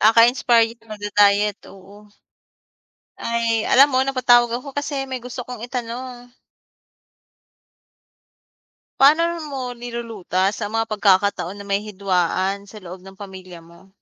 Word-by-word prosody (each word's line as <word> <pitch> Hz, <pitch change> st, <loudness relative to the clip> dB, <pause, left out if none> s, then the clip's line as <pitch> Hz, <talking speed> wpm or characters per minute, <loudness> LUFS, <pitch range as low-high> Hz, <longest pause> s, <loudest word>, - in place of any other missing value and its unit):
Kaka-inspired 230 Hz, +1 st, +4 dB
magda-diet, 205 Hz, -1 st, +2 dB
oo. 200 Hz, +2 st, -16 dB, 1.1 s
Ay, 230 Hz, -1 st, 0 dB
alam 275 Hz, +2 st, +6 dB
mo 255 Hz, -, +3 dB
napatawag 250 Hz, -3 st, +3 dB
ako 270 Hz, +3 st, -9 dB
kasi 285 Hz, -1 st, -3 dB
may 260 Hz, -1 st, -5 dB
gusto 250 Hz, 0 st, -7 dB
'kong 250 Hz, -3 st, -8 dB
itanong. 245 Hz, 0 st, -6 dB, 2.7 s
Paano 300 Hz, +5 st, +6 dB, 0.2 s
mo 270 Hz, -2 st, -5 dB
nilulutas 225 Hz, -5 st, -3 dB
ang 210 Hz, 0 st, -4 dB
mga 225 Hz, 0 st, -1 dB
pagkakataon 200 Hz, -2 st, +1 dB
na 200 Hz, -, -9 dB
may 200 Hz, 0 st, +1 dB
hidwaan 195 Hz, 0 st, -1 dB
sa 215 Hz, +1 st, -11 dB
loob 180 Hz, +1 st, -9 dB
ng 190 Hz, 0 st, -14 dB
pamilya 185 Hz, -3 st, -11 dB
mo? 170 Hz, +3 st, -19 dB
220 Hz, 115 wpm, -21 LUFS, 200-245 Hz, 2.7 s, alam